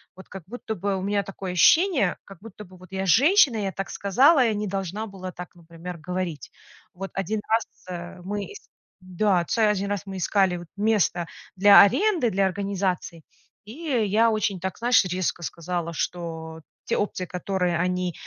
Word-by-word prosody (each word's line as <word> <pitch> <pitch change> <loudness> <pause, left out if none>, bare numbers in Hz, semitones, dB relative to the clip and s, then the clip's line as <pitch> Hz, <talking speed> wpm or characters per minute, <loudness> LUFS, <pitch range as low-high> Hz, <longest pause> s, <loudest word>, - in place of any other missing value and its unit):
вот 190 - -14
как 195 -3 -9
будто 225 0 -6
бы 195 +1 -2
у 185 - -4
меня 200 +1 0
такое 190 -1 -6
ощущение, 290 - +4
как 195 -3 -14
будто 210 -1 -11
бы 185 +1 -16
вот 185 +1 -16
я 190 0 -3
женщина, 275 - +5
я 200 -2 -2
так 195 +1 -5
сказала, 260 - +4
я 225 -3 +1
не 210 +1 -2
должна 195 +2 -4
была 185 -2 -8
так, 180 0 -10
например, 170 +1 -9
говорить. 175 -3 -4 0.4
Вот 195 +2 -7
один 200 +3 -2
раз 225 +1 +2 0.2
раз, 175 +1 -7
э, - - -13
мы 205 +1 -4
ис 415 - -13 0.4
да, 185 0 +1
ц 230 - -1
один 200 -1 -1
раз 205 - 0
раз - - -24
мы 190 -1 -6
искали 180 -2 +1
место 205 -5 +1 0.3
для 200 +2 +9
аренды, 335 - +3
для 195 +1 +2
организации, 190 -3 -3 0.4
и 215 - -10
я 230 - +1
очень 215 -3 -1
так, 190 +1 -4
знаешь, 240 0 +4
резко 180 -1 -2
сказала, 170 0 -4
что 160 -1 -5 0.2
те - - -1
опции, 200 -3 -2
которые 180 -1 -2
они 180 0 -1
195 Hz, 180 wpm, -24 LUFS, 180-210 Hz, 0.4 s, для